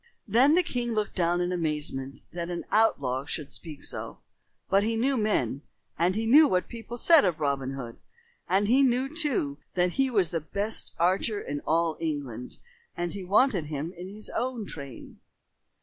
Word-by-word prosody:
Then 255 +9 +5
the 360 - +4
king 240 -6 -2
looked 210 -1 -1
down 175 -1 +1
in 175 0 -1
amazement 150 -5 -2
that 170 0 -4
an 175 -1 -4
outlaw 135 - +2
should 150 -2 -5
speak 155 -2 -7
so. - - -4 0.5
But 195 +1 +4
he 225 +1 0
knew 265 +5 +1
men, 200 - 0 0.3
and 175 +3 +1
he 220 +1 -1
knew 295 +7 +7
what 180 -5 0
people 235 0 -8
said 330 +5 +6
of 175 -4 0
Robin 140 -3 -1
Hood. 120 -4 -7 0.5
And 195 +2 +2
he 255 +5 +5
knew, 265 +3 +1
too, 240 - +1 0.2
that 180 0 +2
he 270 +7 +1
was 200 -9 +2
the 165 - -1
best 200 +7 -2
archer 190 +5 +1
in 145 -5 -4
all 165 0 +1
England 140 -7 -4 0.4
and 175 0 -2
he 200 - -5
wanted 200 - +3
him 150 +3 -4
in 180 +2 -8
his 210 +2 -7
own 245 -2 -2
train. 140 -9 -9
180 Hz, 180 wpm, -27 LUFS, 155-225 Hz, 0.5 s, knew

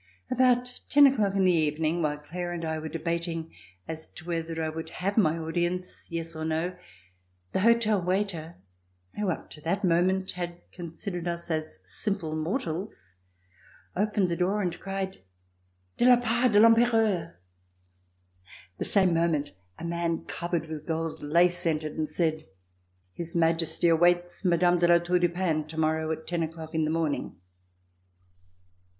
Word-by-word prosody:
About 250 -1 +2
ten 290 0 +7
o'clock 215 -8 +3
in 195 - +3
the 185 - +5
evening, 155 +1 +1
while 150 -2 0
Claire 175 +4 -5
and 170 -1 -4
I 160 0 -2
were 155 0 -5
debating 165 0 -3 0.3
as 160 0 -6
to 170 - -13
whether 165 -1 -3
I 160 - 0
would 160 +1 -5
have 195 +4 -2
my 165 -7 +3
audi 165 +1 -1
ence,"yes" 170 -2 -5
or 160 - -4
"no," 160 +3 -1 0.8
the - - 0
hotel 220 -1 +4
waiter 180 -3 -1 0.6
who 210 -2 -1
up 170 - -4
to 150 - -9
that 170 +7 -1
moment 185 +2 +2
had 175 -1 -5
considered 175 +1 -6
us 170 0 -4
as 155 -8 -3
simple 160 - -2
mortals, 160 - -4 0.8
opened 205 -1 +1
the 170 - 0
door 190 +4 +1
and 175 -2 -2
cried: 195 0 -4 0.8
"De - - +3
la 245 -1 +7
part 240 +1 +2
de 205 - +7
I'Empereur!" 225 - +3 1.4
The - - -1
same 190 -4 +3
moment 165 -3 +1 0.3
a 170 - -7
man 170 -1 -2
covered 170 -1 -2
with 155 -1 -7
gold 165 -1 -2
lace 175 +4 +3
entered 155 -1 -1
and 155 -1 -2
said: 155 -1 -1 0.7
"His 170 0 -4
Majesty 165 0 +2
awaits 175 +2 +3
Mme. 175 -1 +3
de 175 - +4
La 170 0 +7
Tour 175 +1 +1
du 175 0 +3
Pin 165 -4 -1
tomorrow 160 0 0
at 160 0 -4
ten 170 0 -2
o'clock 160 0 -5
in 160 -1 +1
the - - -1
morning." 160 -2 -1
170 Hz, 155 wpm, -28 LUFS, 160-185 Hz, 1.4 s, ten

